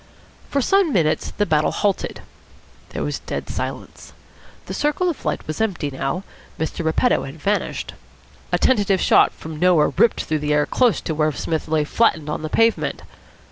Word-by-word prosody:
For 280 -2 0
some 390 -1 +3
minutes 160 - +1
the 205 - -1
battle 155 -4 +2
halted. 200 -2 -1 0.7
There - - -4
was - - -3
dead - - -5
silence. - - -6 0.5
The - - -6
circle 300 +5 +1
of 315 - -11
light - - -2
was 155 +7 -4
empty 175 -9 -1
now. 135 +7 -3 0.3
Mr. 160 +2 -3
Repetto 160 +10 +2
had 135 +4 -9
vanished. 205 +7 -2 0.6
A - - +3
tentative 205 -6 +2
shot - - +5
from 160 -1 -9
nowhere 175 -3 +4
ripped 230 - +3
through 155 -1 -1
the 150 0 0
air 150 0 +3
close 245 - +2
to 160 - -3
where 155 0 +1
Psmith 160 +2 -3
lay 155 -1 +1
flattened 155 -3 +1
on - - -3
the 155 - -4
pavement. 225 +4 +1
165 Hz, 175 wpm, -21 LUFS, 155-220 Hz, 0.7 s, shot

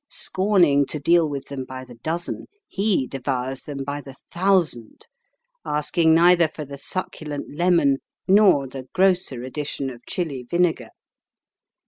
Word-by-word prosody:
Scorning 175 -8 +2
to 150 - -4
deal 165 +2 +3
with 140 -2 -5
them 140 -2 -4
by 130 0 -8
the 125 - -13
dozen, 160 +9 -4 0.2
he 195 -8 +1
devours 130 0 -3
them 140 -2 -6
by 145 +1 -4
the 135 -2 -12 0.2
thousand, 175 - 0 0.6
asking 160 +2 +2
neither 170 0 +5
for 155 -1 -8
the 140 0 -9
succulent 150 -4 -5
lemon 170 -5 +3 0.3
nor 190 -8 +5
the 130 0 -9
grosser 180 -9 +2
addition 135 0 -4
of 120 -1 -13
Chili 155 -8 -3
vinegar. 170 +6 0
150 Hz, 135 wpm, -23 LUFS, 135-175 Hz, 0.6 s, neither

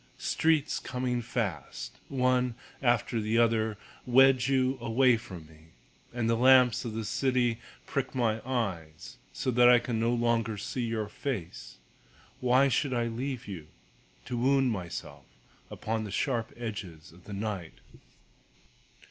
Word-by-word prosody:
Streets 160 -2 +1
coming 125 -1 -2
fast, 115 -6 -4
One 125 -2 +1 0.3
after 120 -2 +1
the 110 +2 0
other, 110 -2 +2 0.3
Wedge 130 +1 +5
you 130 -1 +1
away 120 +2 +4
from 95 -8 -9
me, 80 +1 -20 0.4
And 120 -2 -2
the 115 - +3
lamps 125 0 +5
of 115 -3 -5
the 110 -1 -3
city 125 0 +1 0.3
prick 135 -1 -3
my 115 -3 +1
eyes 95 -12 -4
So 130 - -2
that 120 0 +6
I 125 - +8
can 120 -1 -2
no 115 +1 +1
longer 115 -2 0
see 125 +5 -4
your 110 -2 -2
face. 110 - -6 0.6
Why 130 +2 +4
should 130 +1 0
I 120 -1 +1
leave 125 +1 -4
you, 85 -7 -7 0.6
To 125 -1 -4
wound 135 0 +3
myself 90 -5 -6 0.4
upon 110 0 -3
the 105 - -6
sharp 115 +1 -1
edges 95 -8 -7
of 85 +2 -19
the 105 - -8
night? 100 - -4
120 Hz, 140 wpm, -29 LUFS, 110-125 Hz, 0.6 s, I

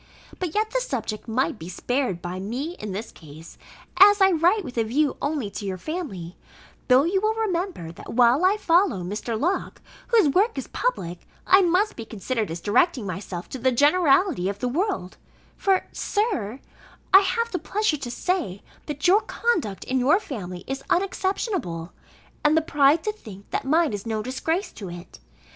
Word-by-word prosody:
But 360 -4 -3
yet 430 +1 +1
the - - 0
subject 230 - -4
might 240 +1 0
be 165 - -8
spared 245 -1 -2
by 180 +1 -4
me 255 - -4
in 210 -1 -5
this 210 +4 -5
case, 155 +1 -13 0.4
as 410 +2 +8
I 385 0 +6
write 355 +5 +3
with 250 - -8
a - - +3
view 275 +6 +1
only 285 -8 -2
to 205 - -6
your 190 -2 -3
family; 195 - -5 0.5
though 255 +1 +6
you 380 +4 +1
will 435 +1 +1
remember, 365 - -2
that 165 - -10
while 245 +6 +4
I 385 +3 +4
follow 335 - +2
Mr. 215 +4 -3
Locke, 355 +8 -1 0.3
whose 455 -8 +4
work 385 - +2
is 270 - -3
public, 180 - -3 0.2
I 380 +1 +6
must 370 +4 +2
be 230 - -6
considered 225 0 -3
as 165 +1 -5
directing 250 - +2
myself 185 -1 -5
to 260 - -6
the 260 +2 +2
generality 290 - +3
of 200 - -4
the 250 - -2
world: 305 - -2 0.4
for, 385 -2 +1
Sir, 275 - -1 0.5
I 385 - +11
have 465 +4 -1
the 360 - -2
pleasure 420 -6 0
to 270 -3 -6
say, 240 - -2 0.2
that 295 +2 -1
your 395 +4 +6
conduct 335 - -1
in 260 0 -1
your 290 +9 +4
family 185 - -7
is 270 0 -4
unexceptionable; 365 - -1 0.5
and 300 +1 +4
the - - +4
pride 295 0 +3
to 425 - 0
think 210 - -13
that - - -2
mine 315 -1 +2
is 205 +2 -5
no 220 -1 -2
disgrace 320 - -2
to 195 -4 -8
it. 175 - -10
275 Hz, 180 wpm, -24 LUFS, -, 0.5 s, I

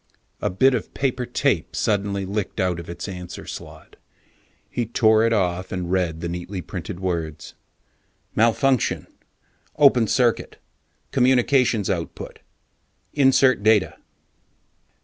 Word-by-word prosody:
A - - 0
bit 130 +9 +3
of 120 - -4
paper 130 -2 -1
tape - - 0
suddenly 100 -2 0
licked 100 +2 -4
out 90 -2 0
of 85 - -9
its 85 - -6
answer 90 -2 -8
slot. - - -10 0.7
He 120 -2 -3
tore 110 -1 +3
it - - 0
off 95 -4 0
and 90 -2 -3
read 85 -4 0
the 85 - -3
neatly 90 +3 -5
printed 85 - -7
words: 85 -5 -4 0.8
MALFUNCTION, 115 +3 +2 0.7
OPEN 135 -6 +5
CIRCUIT, 120 +1 +1 0.5
COMMUNICATIONS 125 -4 +3
OUTPUT; 85 -3 -5 0.7
INSERT 135 -4 +4
DATA. 105 -2 +3
105 Hz, 115 wpm, -23 LUFS, 90-125 Hz, 0.8 s, OPEN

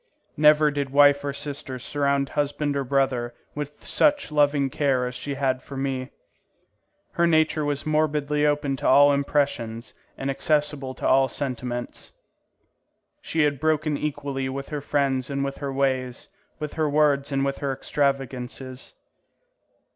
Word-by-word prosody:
Never 150 0 +5
did 140 -1 -2
wife 145 0 +5
or 140 - -2
sister 140 -2 -5
surround 140 +1 0
husband 145 0 -1
or 140 - 0
brother 130 -3 0 0.2
with 150 0 -7
such 290 - +3
loving 145 -2 +2
care 135 -3 +1
as 125 - -4
she 140 +2 -5
had 130 -2 0
for 135 +1 -9
me. 135 -1 -2 1.0
Her 170 0 +2
nature 160 -1 +2
was 145 -1 -2
morbidly 150 -1 +1
open 145 -2 +1
to - - -2
all 145 +2 +6
impressions 140 -5 -1 0.2
and 135 0 -2
accessible 145 -2 0
to - - -2
all 135 0 +4
sentiments. 125 -3 -5 1.1
She 165 - -1
had 145 -2 +1
broken 155 0 +1
equally 140 -2 -3
with 135 +1 -5
her 150 -2 -4
friends 135 -2 0
and 140 0 -1
with 140 0 -4
her 140 -1 -3
ways, 130 -1 -1 0.3
with 150 -2 -5
her 155 -2 0
words 145 -1 +2
and 135 0 +1
with 140 0 -2
her 140 -1 -1
extravagances. 135 -2 -3
140 Hz, 145 wpm, -24 LUFS, 135-150 Hz, 1.1 s, all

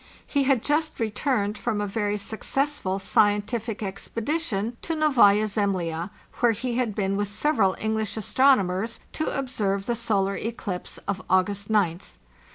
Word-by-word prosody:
He 280 -2 +1
had 260 -4 +2
just 310 +1 0
returned 215 -2 0
from 220 -3 -1
a 205 - 0
very 205 0 -1
successful 220 0 -1
scientific 210 +3 +1
expedition 230 - -2
to 330 - -2
Novaya 235 -9 +5
Zemlya, 185 -5 -1 0.3
where 240 -2 +4
he 240 +2 -3
had 235 -5 0
been 195 -1 0
with 205 0 0
several 205 -3 +2
English 220 0 -1
astronomers 220 -3 +2
to 310 - -2
observe 210 -8 -1
the 240 - 0
solar 200 -4 0
eclipse 205 -5 -4
of 200 -1 -2
August 195 +2 +1
gth. 195 -5 0
215 Hz, 140 wpm, -25 LUFS, 195-240 Hz, 0.3 s, Novaya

